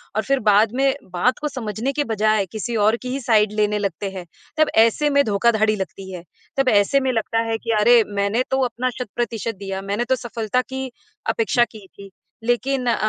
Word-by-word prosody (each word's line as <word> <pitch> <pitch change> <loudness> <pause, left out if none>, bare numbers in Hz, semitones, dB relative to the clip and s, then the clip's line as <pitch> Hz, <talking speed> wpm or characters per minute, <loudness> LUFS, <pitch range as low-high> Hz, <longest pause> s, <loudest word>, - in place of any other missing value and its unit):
और 215 - 0
फिर 275 0 +1
बाद 210 +2 +4
में 270 +1 +2 0.2
बात 245 +9 +1
को 300 - -2
समझने 225 +2 -2
के 295 - 0
बजाय 215 -2 +1
किसी 230 +2 -4
और 215 +1 +3
की 255 - -5
ही 265 +2 -2
साइड 215 -5 +3
लेने 210 0 +1
लगते 200 0 -3
हैं। 185 -2 -7 0.3
तब 310 -1 +3
ऐसे 230 +7 +4
में 280 0 +4
धोखाधड़ी 215 +1 +2
लगती 190 -1 -6
है। 175 -2 -8 0.3
तब 270 -1 +3
ऐसे 205 +6 +3
में 260 -1 0
लगता 225 0 -1
है 225 - 0
कि, 230 +1 -4
"अरे! 235 +2 +6
मैंने 205 +4 0
तो 265 - +2
अपना 250 +1 -2
शत-प्रतिशत 230 -2 -3
दिया, 195 0 -5
मैंने 200 +5 -2
तो 260 - +2
सफलता 235 -1 -2
की 265 -1 -5 0.4
अपेक्षा 435 - +2
की 210 -4 -13
थी। 200 +1 -13 0.3
लेकिन 250 +2 0
अ, 235 - +3
225 Hz, 200 wpm, -21 LUFS, 205-255 Hz, 0.4 s, अरे